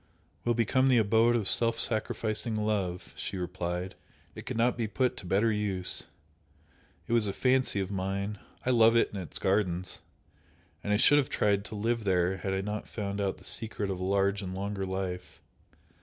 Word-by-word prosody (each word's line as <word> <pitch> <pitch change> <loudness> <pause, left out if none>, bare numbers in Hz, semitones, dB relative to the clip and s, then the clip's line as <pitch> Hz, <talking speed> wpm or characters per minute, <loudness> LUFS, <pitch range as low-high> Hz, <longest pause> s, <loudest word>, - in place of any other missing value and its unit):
"Will 120 0 +2
become 120 +4 +2
the 130 -2 +5
abode 115 +2 +4
of 110 -5 0
self 115 +2 +4
sacrificing 110 0 -1
love," 105 -4 -2
she 100 - -5
replied 90 0 -3 0.4
"It - - -10
could - - -3
not 120 +1 +2
be 115 -2 -2
put 125 +4 0
to 95 - -9
better 105 +5 +2
use! 100 -4 0 1.0
It - - -3
was 115 -3 +4
a 100 - -2
fancy 130 -2 +2
of 95 0 -3
mine; 100 +1 -3 0.3
I 130 - +2
love 115 -1 +5
it 115 - +2
and 100 - -4
its 85 - -7
gardens 95 -2 0 0.8
and 105 - -2
I 105 - +4
should 145 +6 +6
have 140 - -1
tried 100 -1 +1
to 110 - -7
live 115 +2 -1
there 95 -1 +1
had 95 +1 -3
I 95 0 0
not 105 +1 -4
found 100 -2 -4
out 100 -1 -1
the - - -17
secret 105 -3 -2
of 95 - -4
a - - -3
large 100 +1 +1
and 95 -1 -5
longer 100 0 -3
life!" 95 -1 -4
100 Hz, 190 wpm, -29 LUFS, 95-115 Hz, 1.0 s, should